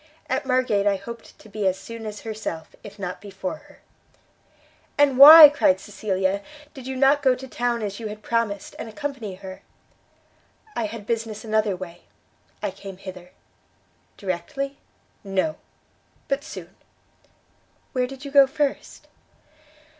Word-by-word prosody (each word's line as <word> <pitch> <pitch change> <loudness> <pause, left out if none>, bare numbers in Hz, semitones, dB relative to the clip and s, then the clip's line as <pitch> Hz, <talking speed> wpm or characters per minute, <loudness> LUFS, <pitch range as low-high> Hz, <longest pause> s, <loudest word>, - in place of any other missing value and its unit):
At - - -2
Margate 250 -6 +2
I 200 - +3
hoped 235 +3 -10
to - - -16
be 210 -1 -2
as 185 0 +1
soon 225 +3 -8
as 210 -1 -7
herself, 215 -8 -6
if 205 0 -11
not 185 -2 -5
before 190 -2 -5
her." - - -20 1.2
"And 285 -2 +4
why," 305 +2 +13
cried 235 -10 +2
Cecilia, 195 -1 -2 0.3
"did 260 -2 -10
you 265 - -4
not 275 +2 +4
go 260 -2 +4
to 265 +1 -9
town 240 -2 -1
as 200 0 -4
you 225 - -5
had 210 0 -9
promised, 230 -4 -2
and 225 - -6
accompany 265 -7 -5
her?" 190 0 -10 1.1
"I 225 - -1
had 210 -1 -8
business 225 -1 -3
another 215 -2 +1
way. 175 -1 -9 0.6
I - - -1
came 195 -2 -10
hither." 185 -2 -10 0.9
"Directly?" 270 - -4 0.4
"No; 195 +10 -1 0.7
but 275 +1 -1
soon." - - -10 1.2
"Where 250 -2 0
did 270 +2 -10
you 280 - -6
go 280 -1 +7
first?" 285 0 -3
220 Hz, 145 wpm, -24 LUFS, 195-265 Hz, 1.2 s, why